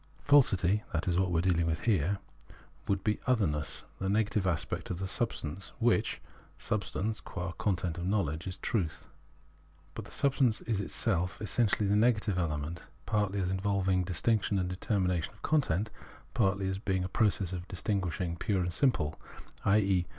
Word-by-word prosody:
Falsity 105 -8 +4
(that 85 +1 -1
is 90 0 +2
what 95 -1 +2
we 85 - +1
are - - +3
dealing 85 -3 +2
with 80 0 -1
here) 100 -3 +2 0.7
would 100 -1 0
be 105 - +1
otlierness, 80 - 0 0.2
the 95 - -1
negative 105 -1 +1
aspect 85 -4 -2
of 90 - -2
the 95 +1 -3
substance, 90 0 -2
which 120 -6 +2 0.4
[substance], 110 0 -2
qua 90 -1 -5
content 90 -3 -1
of 85 - -3
knowledge, 90 -5 0
is 95 - -4
truth. 95 -10 -2 0.9
But - - -6
the - - -13
substance 130 -5 +2
is 110 -4 -1
itself 90 -3 -1
essentially 105 -1 +1
the 100 - +3
negative 105 -3 +3
element, 80 0 -3 0.2
partly 105 -2 0
as 90 - 0
involving 95 -1 +1
distinction 100 +3 +1
and 90 -1 -1
determina 90 -2 0
tion 95 - -7
of 100 - -23
content, 110 - +1 0.4
partly 95 -3 +1
as 95 0 -2
being 95 -3 0
a - - -1
process 100 -3 +1
of 90 0 -5
distin 100 +2 -1
guishing 85 -1 -3
pure 100 -4 +1
and 90 -1 -1
simple, 85 - +1 0.4
i.e. 100 -3 +3
95 Hz, 165 wpm, -31 LUFS, 90-105 Hz, 0.9 s, Falsity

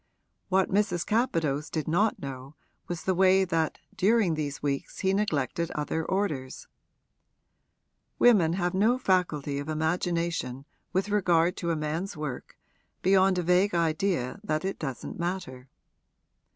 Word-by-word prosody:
What 190 0 +2
Mrs. 195 -4 +1
Capadose 160 - 0
did 155 -2 -3
not 205 +7 +2
know 135 +1 -8 0.3
was 175 -2 -5
the 190 - +1
way 190 +1 +4
that 165 -3 0 0.2
during 200 -1 +3
these 145 -2 -4
weeks 140 -1 -3
he 190 0 +2
neglected 170 - 0
other 150 +2 -2
orders: 155 -9 -2 1.5
women 190 -9 +5
have 180 0 -1
no 220 +6 +3
faculty 160 - 0
of 145 +2 -6
imagination 160 -4 -1 0.3
with 190 +3 0
regard 175 -4 +2
to 170 - -2
a 165 - +1
man's 155 +4 -3
work 150 -5 -6 0.5
beyond 190 0 +4
a 180 - 0
vague 180 +3 +3
idea 165 -2 0
that 155 -3 -1
it 195 - -3
doesn't 135 -6 -5
matter. 170 -8 -4
170 Hz, 135 wpm, -28 LUFS, 150-190 Hz, 1.5 s, women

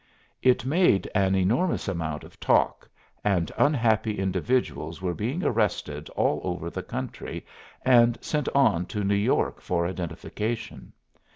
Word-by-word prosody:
It 125 -2 +3
made 140 - +3
an 95 -2 +2
enormous 115 - +1
amount 80 -5 -3
of - - -15
talk, - - +1 0.3
and 90 -5 +1
unhappy 115 -6 +2
individuals 95 - -1
were 90 -1 -2
being 125 - -2
arrested 90 -9 -1
all - - +1
over - - -3
the - - -4
country, - - -6 0.4
and 120 -2 +5
sent 150 -2 -1
on 90 -11 +3
to 105 - -3
New 100 +1 +2
York 100 +1 +1
for 85 -1 0
identification. 95 +6 -4
105 Hz, 130 wpm, -26 LUFS, 90-120 Hz, 0.4 s, and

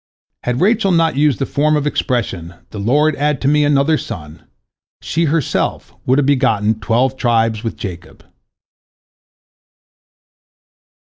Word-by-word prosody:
Had 125 0 -1
Rachel 205 0 +2
not 165 -3 +2
used 145 -1 +2
the 135 - -1
form 150 +3 +1
of 145 - -2
expression, 100 - -2 0.2
"The 105 - -7
Lord 145 +8 +2
add 145 -1 0
to 135 - 0
me 150 +1 +3
another 145 +2 +2
son," 75 0 -9 0.5
she 165 +1 -1
herself 155 -2 -1
would 130 +2 +3
have 145 - +2
begotten 110 -6 +1
twelve 120 +5 +1
tribes 115 -3 +1
with 115 - -3
Jacob. 90 -4 -9
135 Hz, 130 wpm, -17 LUFS, 115-150 Hz, 0.5 s, me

